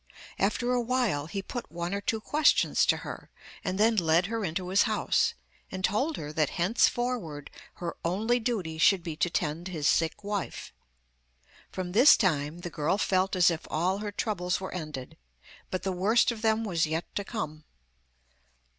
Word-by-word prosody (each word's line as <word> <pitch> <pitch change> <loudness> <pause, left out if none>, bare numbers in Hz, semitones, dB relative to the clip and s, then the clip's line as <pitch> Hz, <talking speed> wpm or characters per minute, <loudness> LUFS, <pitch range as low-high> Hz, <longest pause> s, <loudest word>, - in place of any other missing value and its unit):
After 245 0 +1
a 250 -1 +2
while 235 - 0
he 195 +3 -4
put 245 +4 -6
one 170 +2 -3
or 200 - -2
two 220 +2 -1
questions 295 +7 +3
to - - +3
her, - - -8 0.3
and 185 - -2
then 225 +2 +4
led 170 -2 +3
her 225 +2 -3
into 180 +1 -3
his 195 +2 +4
house, - - +1 0.4
and 185 0 -5
told 270 +10 0
her 150 0 -6
that 155 -2 +1
henceforward 190 - 0 0.2
her 175 -1 -5
only 215 +8 +1
duty 195 -10 -2
should 185 +1 +4
be 165 -3 -5
to 175 - +1
tend 165 +2 -2
his 160 -6 -1
sick 165 +5 +1
wife. 205 -1 -4 1.0
From 185 -1 -5
this 245 +10 +7
time 160 -4 0
the 175 - -6
girl 155 +6 0
felt 190 -1 +1
as 180 -1 +5
if 165 - -5
all 180 +5 0
her 210 0 -4
troubles 185 -4 -1
were 190 - -6
ended, 155 -7 -6 0.5
but 185 - -3
the 190 - -1
worst 205 +7 +3
of 225 -2 -7
them 220 0 +2
was 170 -7 0
yet 160 +2 -2
to 200 - -2
come. 155 -9 -5
185 Hz, 175 wpm, -28 LUFS, 165-220 Hz, 1.0 s, this